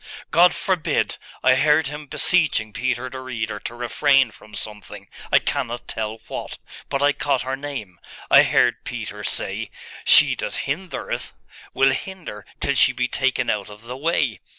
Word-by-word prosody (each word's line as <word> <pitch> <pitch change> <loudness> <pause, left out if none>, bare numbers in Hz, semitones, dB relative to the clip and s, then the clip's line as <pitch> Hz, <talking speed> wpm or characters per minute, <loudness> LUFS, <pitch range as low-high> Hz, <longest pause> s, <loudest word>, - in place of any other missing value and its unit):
'God 175 +2 +6
forbid! 185 -4 0 0.2
I - - +6
heard 150 +3 +4
him 150 +1 -6
beseeching 145 -12 +2
Peter 125 +2 -1
the 130 +1 -7
Reader 115 -5 -4
to 115 - -7
refrain 130 +1 +3
from 105 +1 -14
something, 105 -2 -7 0.2
I - - +7
cannot 120 -4 -2
tell 110 0 -4
what; - - -6 0.3
but 140 0 0
I 145 - +5
caught 140 -3 0
her 130 +1 -2
name.... 135 -11 -7 0.3
I - - +9
heard - - +2
Peter - - -6
say, - - -1 0.3
"She - - +7
that - - -3
hindereth 170 +6 -4 0.4
will 135 0 +4
hinder 165 - -6
till 140 - +1
she 135 -1 +5
be 125 -1 0
taken 130 +1 0
out 105 -1 -3
of 105 +1 -13
the 125 +2 -7
way." 160 +6 0
130 Hz, 160 wpm, -22 LUFS, 110-145 Hz, 0.4 s, I